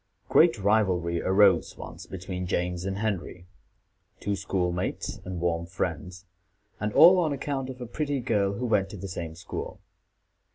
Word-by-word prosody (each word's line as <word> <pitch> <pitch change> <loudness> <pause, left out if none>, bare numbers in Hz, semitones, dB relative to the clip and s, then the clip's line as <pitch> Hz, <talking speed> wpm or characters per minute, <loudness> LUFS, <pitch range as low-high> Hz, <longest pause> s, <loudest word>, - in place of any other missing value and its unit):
Great 120 - +5
rivalry 95 -5 +1
arose 95 +1 +3
once - - -9
between 90 -1 -5
James 90 0 -1
and 95 0 -2
Henry, 95 -4 -3 0.7
two 100 0 -1
school 95 -2 -1
mates 90 +1 -3
and 90 -1 -5
warm 85 -1 -1
friends, 90 +1 -4 0.5
and 105 0 -1
all 180 +3 +8
on 160 -4 +1
account 135 -1 -3
of 130 -1 -8
a 125 - -5
pretty 145 +3 -2
girl 105 -5 +1
who 120 +5 -3
went 100 -5 +1
to 105 - -8
the 100 +1 -6
same 85 -3 -6
school. 90 - -6
95 Hz, 160 wpm, -27 LUFS, 90-110 Hz, 0.7 s, all